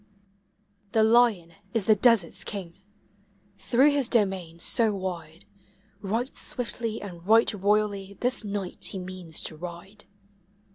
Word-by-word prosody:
The 220 - +4
lion 220 -7 +3 0.2
is 220 -4 +1
the 220 - +6
desert's 210 -5 +3
king; 190 -2 -7 0.8
through 250 +9 +4
his 280 -4 +1
domain 190 -7 0
so 220 +4 +2
wide 175 -3 -6 0.6
Right 225 +6 -2
swiftly 230 -2 -4
and 175 -4 -9
right 225 +1 +5
royally 200 -1 0
this 250 -1 +1
night 200 -3 -5
he - - -3
means 180 -3 -6
to 160 - -1
ride. 180 +5 -9
200 Hz, 125 wpm, -26 LUFS, 180-225 Hz, 0.8 s, the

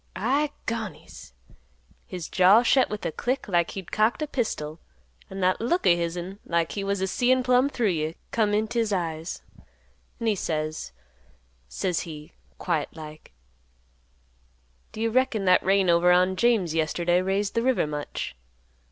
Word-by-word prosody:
I 275 +8 +1 0.2
gonies! 220 - -6 0.7
His 180 -3 -6
jaw 195 +5 +5
shet 260 +2 +3
with 210 0 -5
a - - -1
click 255 - -2
like 175 -3 +1
he'd 190 - -7
cocked 220 +8 +1
a - - -3
pistol, 165 - -3 0.5
an' 195 0 -6
that 185 +2 +2
look 345 +11 0
o' 175 - +6
hisn, 175 +3 -4
like 170 -1 0
he 200 - -3
was 200 -1 -1
a - - +2
seein' 255 +6 +2
plumb 255 +2 +3
through 235 -7 0
you, 160 -1 -2 0.2
come 215 -2 +1
int' 215 +2 -1
his 230 -3 0
eyes, 165 -3 -3 0.8
an' 230 - -4
he 220 - +3
says, 155 - -3 0.8
says 170 - -2
he, 150 -3 -8 0.2
quiet 165 -5 -1
like, 155 -1 -11 1.6
'D' 220 - -7
you 225 0 +1
reckon 250 -4 +1
that 185 0 +5
rain 195 0 +2
over 170 +1 +4
on 180 +1 +3
James 210 -7 +2
yesterday 170 +2 +1
raised 195 +2 -1
th' 230 - +1
river 255 -5 +2
much? 150 - -5
190 Hz, 160 wpm, -26 LUFS, 170-230 Hz, 1.6 s, o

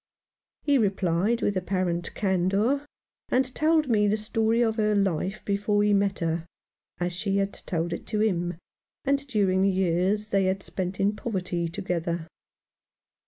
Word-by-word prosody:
He 285 -2 +3
replied 195 +1 +1
with 205 - +1
apparent 180 -2 -1
candour, 200 +9 +1 0.4
and 255 0 +1
told 310 -1 +2
me 210 -4 +3
the 210 +1 +2
story 225 +2 +1
of 225 -1 0
her 215 -1 +2
life 195 0 0
before 205 +1 +1
he 210 0 +3
met 200 0 +2
her 165 0 -1 0.3
— - - -45
as 175 0 -1
she 195 +2 -1
had 195 0 0
told 170 -1 -3
it - - -6
to 215 - -1
him 175 -5 0 0.3
— - - -48
and 280 0 +1
during 195 -6 +2
the 195 - +4
years 190 +3 +1
they 195 -2 +2
spent 185 -1 -4
in 205 +2 +2
poverty 185 -6 -2
together. 170 -1 -2
195 Hz, 160 wpm, -26 LUFS, 180-215 Hz, 0.4 s, the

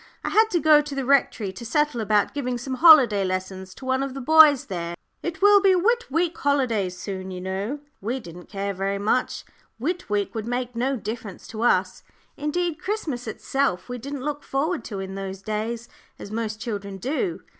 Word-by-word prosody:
"I - - -1
had 440 +1 +4
to 355 - +1
go 310 -2 +6
to 290 -1 -7
the 270 -1 -2
Rectory 245 -7 +2
to 190 - -9
settle 270 +1 0
about 210 -1 +2
giving 250 -4 -2
some 260 +2 -5
holiday 260 - +7
lessons 185 0 -4
to 265 - -11
one 260 0 +1
of 275 -1 -3
the - - -4
boys 305 0 +6
there. 170 -2 -4 0.3
It 345 +2 -5
will 410 0 +7
be 385 -1 +5
Whit 470 +7 +2
week 330 +4 0
holidays 230 -10 0
soon, 190 0 -5
you 185 -1 -6
know." 195 +10 -4 0.2
We 235 +6 -2
didn't 175 -5 -12
care 200 0 -3
very 195 +1 -2
much; 215 +5 0 0.3
Whit 340 +8 -3
week 205 -1 -1
would 220 -1 -4
make 245 0 -3
no 260 +4 0
difference 215 -3 -7
to 220 0 -6
us. 240 - +2 0.3
Indeed, 315 +2 -2
Christmas 310 - -3
itself 255 -2 -1
we 245 0 -4
didn't 275 +2 -6
look 295 -1 -3
forward 305 +5 -1
to 205 -4 -5
in 190 0 -6
those 195 0 -6
days, 225 +2 -3 0.3
as 200 - -9
most 220 -1 -3
children 200 -4 -5
do. 305 - -2
245 Hz, 195 wpm, -24 LUFS, 200-295 Hz, 0.3 s, holiday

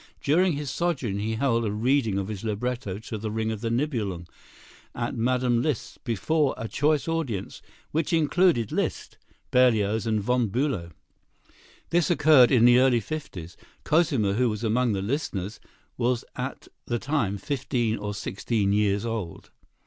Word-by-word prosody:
During 175 +5 +3
his 145 -2 -4
sojourn 135 - -1
he 110 +2 -2
held 115 -1 +1
a 105 - -1
reading 115 -1 +1
of 100 -1 -2
his 105 -2 -6
libretto 115 -1 -3
to 110 0 -6
"The 110 +1 -4
Ring 110 +1 -2
of 110 -2 -5
the 115 - -1
Nibelung" 115 - -2 0.7
at - - -3
Mme. 125 0 +1
Liszt's 145 -4 -3
before 140 +5 0
a 115 - -4
choice 150 +5 +1
audience, 140 - -3 0.3
which 160 +1 -1
included 160 - +2
Liszt, - - -3 0.3
Berlioz 110 -3 +3
and 110 -1 +1
Von 120 +2 +1
Bülow. 120 - -1 1.0
This 175 -1 +2
occurred 150 -7 +6
in 120 -3 +5
the 120 0 +7
early 130 -2 +4
fifties. 100 - -7 0.3
Cosima, 145 - +2
who 125 +3 +2
was 105 +1 -4
among 115 +1 +1
the 95 -1 -2
listeners, 105 - -3 0.4
was 120 0 0
at - - -5 0.2
the 120 - 0
time 120 -7 -1
fifteen 120 -2 -1
or 105 0 -4
sixteen 100 +1 -1
years 105 0 +1
old. 110 -8 -5
115 Hz, 155 wpm, -26 LUFS, 105-140 Hz, 1.0 s, the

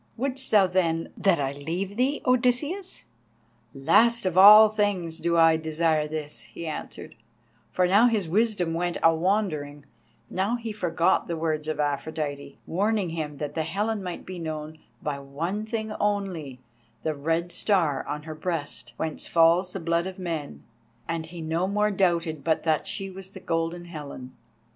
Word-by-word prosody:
Wouldst 265 +1 -1
thou, 205 -3 +6
then, 170 -3 0
that 190 -5 +2
I 135 -1 -1
leave 170 +8 -4
thee, 260 +5 0
Odysseus?" 255 +10 0 0.7
"Last 230 - +3
of 185 -2 0
all 210 +3 +10
things 200 -6 -1
do 170 0 +1
I 165 -1 +6
desire 160 -1 0
this," 150 -1 -5
he 170 - -9
answered, 155 - -6 0.6
for 180 - +1
now 205 +6 +5
his 215 -7 0
wisdom 195 -2 +1
went 175 +1 -1
a 165 - +6
wandering; 160 -6 -1 0.4
now 195 - -1
he 230 -2 -5
forgot 175 -3 +1
the 170 - -3
words 155 -1 -2
of 155 -1 -3
Aphrodite, 145 -1 -3
warning 200 0 0
him 155 -3 -4
that 145 0 -4
the 160 - -1
Helen 205 +7 -2
might 180 -2 -6
be 185 -1 -7
known 155 -1 -6 0.2
by 145 -2 -2
one 165 +10 -4
thing 220 -1 -3
only, 185 -10 -2 0.4
the 155 - 0
Red 165 +4 -1
Star 165 -11 +1
on 150 0 -4
her 155 0 -7
breast, 155 -7 -4
whence 160 -1 -3
falls 170 +2 +4
the 195 - -4
blood 170 +1 0
of 190 - -7
men; 165 -6 -5 0.4
and 165 -1 -3
he 170 0 -8
no 165 +3 -1
more 210 +1 +1
doubted 170 -6 0
but 160 +1 +1
that 155 -2 +1
she 195 -1 -4
was 190 0 -9
the 190 - -11
Golden 165 0 -2
Helen. 140 -6 -9
170 Hz, 165 wpm, -26 LUFS, 155-200 Hz, 0.7 s, all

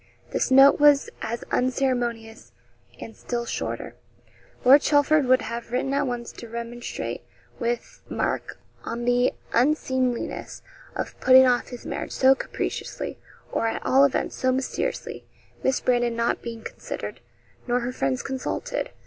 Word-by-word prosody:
This - - 0
note 270 +1 +7
was 290 -1 +5
as 235 +2 -4
unceremonious, 245 -3 -1 0.5
and 225 - -9
still 240 -1 -4
shorter. - - -4 0.7
Lord 275 +3 +8
Chelford 290 -1 +3
would 255 0 +4
have 235 0 -6
written 265 +2 -1
at 280 0 +1
once 240 -1 -4
to 235 - -11
remonstrate 235 +1 -5 0.4
with 235 0 -3
Mark - - -2 0.3
on 235 +1 -4
the 245 +1 +3 0.2
unseemliness 255 -1 0 0.3
of - - -5
putting 260 0 +7
off 245 -1 +2
his 245 -2 -9
marriage - - -4
so 265 0 +6
capriciously, 270 - -4 0.3
or, 230 - 0
at 225 - -3
all 270 +2 +5
events, 280 -2 +1
so 255 - +1
mysteriously 265 - -3 0.3
Miss 265 - +1
Brandon 240 -1 +1
not 235 0 0
being 230 -1 -7
considered, - - -6 0.5
nor 245 0 +1
her 245 +1 -2
friends 135 - -1
consulted. 275 - -3
250 Hz, 140 wpm, -25 LUFS, 235-265 Hz, 0.7 s, Lord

